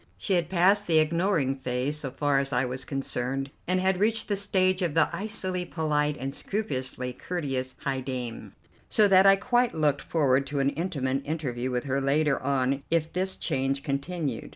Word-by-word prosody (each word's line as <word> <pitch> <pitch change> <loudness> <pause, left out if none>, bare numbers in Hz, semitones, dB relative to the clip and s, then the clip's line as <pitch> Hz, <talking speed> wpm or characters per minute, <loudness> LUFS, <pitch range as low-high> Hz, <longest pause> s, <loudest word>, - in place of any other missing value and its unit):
She 200 - -1
had 170 -3 +1
passed 195 +3 +3
the 165 -2 +4
ignoring 155 -3 +2
phase 130 +3 -2
so 140 - -4
far 140 +1 +1
as 135 0 -2
I 125 0 +1
was 125 +1 -4
concerned, 135 0 -2 0.2
and 185 +1 +2
had 190 0 +1
reached 220 +2 +1
the 205 - +2
stage 190 -1 +1
of 170 -4 -1
the 165 - +4
icily 190 -2 -1
polite 150 -3 -1
and 135 +1 -4
scrupulously 130 -10 -3
courteous 135 -6 -4
high 135 -1 -1
dame, 125 -3 -5 0.4
so 210 -2 +5
that 190 0 +6
I 195 - +8
quite 240 +4 +1
looked 150 -3 +1
forward 140 -4 +1
to 145 0 -2
an 135 0 +2
intimate 140 -6 -2
interview 135 -5 -3
with 125 -1 -1
her 135 0 -1
later 140 +1 +1
on 135 0 0
if 165 -1 0
this 185 +1 -1
change 135 +1 -1
continued. 140 -2 -3
145 Hz, 180 wpm, -27 LUFS, 135-180 Hz, 0.4 s, I